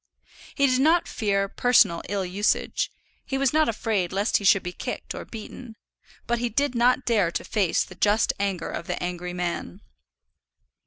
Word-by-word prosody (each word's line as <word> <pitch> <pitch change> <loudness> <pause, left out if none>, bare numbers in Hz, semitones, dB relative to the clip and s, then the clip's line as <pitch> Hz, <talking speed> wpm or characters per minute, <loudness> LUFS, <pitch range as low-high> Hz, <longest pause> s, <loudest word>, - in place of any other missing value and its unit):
He 280 - +3
did 255 -1 +2
not 330 +4 +3
fear 200 -3 0
personal 210 -6 +3
ill 200 -1 -1
usage; 195 +4 0 0.3
he 270 - -3
was 270 -1 +1
not 310 -3 +3
afraid 215 -5 -1
lest 200 +3 +1
he - - -7
should 195 0 +4
be 180 - -4
kicked - - -6
or - - -7
beaten; 225 +1 -9 0.5
but 240 0 0
he 240 0 -1
did 280 +4 0
not 245 +2 +2
dare 210 -7 +2
to - - -3
face 195 -6 +1
the - - -12
just 210 +2 +2
anger 195 -4 -2
of 170 - -6
the - - -2
angry 180 0 -4
man. 175 - -4
210 Hz, 175 wpm, -25 LUFS, 185-245 Hz, 0.5 s, should